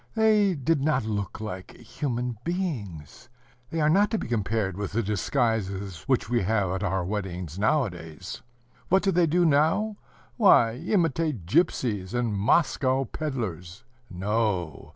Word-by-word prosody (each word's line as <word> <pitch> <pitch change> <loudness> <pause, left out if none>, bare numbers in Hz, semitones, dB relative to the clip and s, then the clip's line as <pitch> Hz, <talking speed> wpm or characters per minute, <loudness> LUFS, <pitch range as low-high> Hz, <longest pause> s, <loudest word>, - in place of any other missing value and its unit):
They 215 -4 +4
did 145 +1 0
not 140 -5 +1
look 105 -2 -3
like 100 -4 -7
human 120 -1 -4
beings. 120 - -4 0.4
They 165 - -3
are 150 - +3
not 200 +6 +4
to 225 - 0
be - - -4
compared 105 -4 -1
with 100 0 -4
the 115 +2 +1
disguises 100 - -1
which 130 -2 +1
we 120 +1 +1
have 100 -1 +1
at 95 +1 -2
our 95 -2 -1
weddings 90 -4 -4
nowadays. 100 - -2 0.5
What 190 +2 +4
do 195 - +2
they 175 -1 +3
do 175 +3 +3
now? 165 +8 +2 0.4
Why, 155 - +6
imitate 160 - 0
gypsies 110 - 0
and 120 -3 0
Moscow 130 +4 +2
pedlers. 105 - -5 0.3
No! 95 -4 -2
115 Hz, 140 wpm, -26 LUFS, 95-155 Hz, 0.5 s, Why